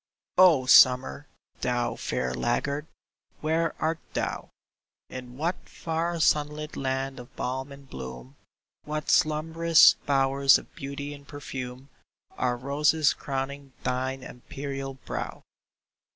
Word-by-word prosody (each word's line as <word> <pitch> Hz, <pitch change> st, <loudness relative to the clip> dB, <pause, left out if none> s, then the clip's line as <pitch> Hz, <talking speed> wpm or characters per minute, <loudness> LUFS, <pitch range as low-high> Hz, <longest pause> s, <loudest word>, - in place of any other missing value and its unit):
E. -, -, -67 dB
O 160 Hz, -8 st, +6 dB
Summer, 130 Hz, +3 st, +6 dB, 0.3 s
thou 120 Hz, -1 st, -1 dB
fair 65 Hz, 0 st, -2 dB
laggard, 140 Hz, -, -1 dB, 0.5 s
where 160 Hz, +1 st, 0 dB
art 160 Hz, +1 st, 0 dB, 0.2 s
thou? -, -, -2 dB, 0.6 s
In 125 Hz, -1 st, -9 dB
what 170 Hz, +5 st, -3 dB
far 165 Hz, +1 st, -2 dB
sunlit 150 Hz, 0 st, +1 dB
land 135 Hz, 0 st, -2 dB
of 125 Hz, -, -13 dB
balm 130 Hz, +2 st, -3 dB
and 140 Hz, 0 st, -12 dB
bloom, 65 Hz, -, -9 dB, 0.5 s
What 150 Hz, 0 st, -2 dB
slumbrous 160 Hz, +2 st, +5 dB
bowers 135 Hz, 0 st, +4 dB
of -, -, -13 dB
beauty 140 Hz, +1 st, -6 dB
and 140 Hz, -1 st, -13 dB
perfume, 135 Hz, -2 st, -7 dB, 0.5 s
Are 125 Hz, -1 st, 0 dB
roses 145 Hz, +4 st, +2 dB
crowning 135 Hz, 0 st, -5 dB
thine 130 Hz, +1 st, -2 dB
imperial 135 Hz, +2 st, -6 dB
brow -, -, -6 dB
140 Hz, 115 wpm, -27 LUFS, 130-150 Hz, 0.6 s, O